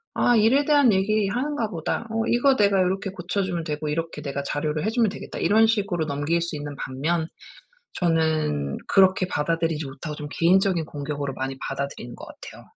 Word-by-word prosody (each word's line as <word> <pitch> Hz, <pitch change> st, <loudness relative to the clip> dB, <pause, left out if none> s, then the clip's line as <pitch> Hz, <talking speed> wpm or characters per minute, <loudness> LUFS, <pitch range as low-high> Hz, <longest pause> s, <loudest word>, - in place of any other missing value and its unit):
'아 245 Hz, -, +3 dB
일에 235 Hz, +7 st, +4 dB
대한 285 Hz, -5 st, +5 dB
얘기 205 Hz, +2 st, +2 dB
하는가 250 Hz, 0 st, -1 dB
보다. 175 Hz, +5 st, -3 dB
어 225 Hz, 0 st, 0 dB
이거 260 Hz, +3 st, +3 dB
내가 200 Hz, -3 st, +3 dB
요렇게 190 Hz, +1 st, -1 dB
고쳐주면 180 Hz, -1 st, -2 dB
되고 150 Hz, -1 st, -3 dB
이렇게 160 Hz, 0 st, -3 dB
내가 140 Hz, -1 st, -3 dB
자료를 150 Hz, +4 st, -2 dB
해주면 225 Hz, 0 st, +2 dB
되겠다.' 200 Hz, -, -8 dB
이런 220 Hz, +2 st, +4 dB
식으로 200 Hz, -7 st, 0 dB
넘길 145 Hz, +4 st, 0 dB
수 170 Hz, -2 st, -3 dB
있는 145 Hz, 0 st, -6 dB
반면 160 Hz, +6 st, -2 dB, 0.7 s
저는 155 Hz, -, 0 dB
그렇게 190 Hz, -1 st, +4 dB
받아들이지 160 Hz, 0 st, -1 dB
못하고 145 Hz, +3 st, -7 dB
좀 150 Hz, -, -6 dB
개인적인 180 Hz, 0 st, +3 dB
공격으로 145 Hz, -2 st, -4 dB
많이 135 Hz, 0 st, -4 dB
받아들이는 135 Hz, -3 st, -5 dB
것 -, -, -9 dB
같아요. -, -, -12 dB
170 Hz, 400 characters per minute, -24 LUFS, 150-205 Hz, 0.7 s, 대한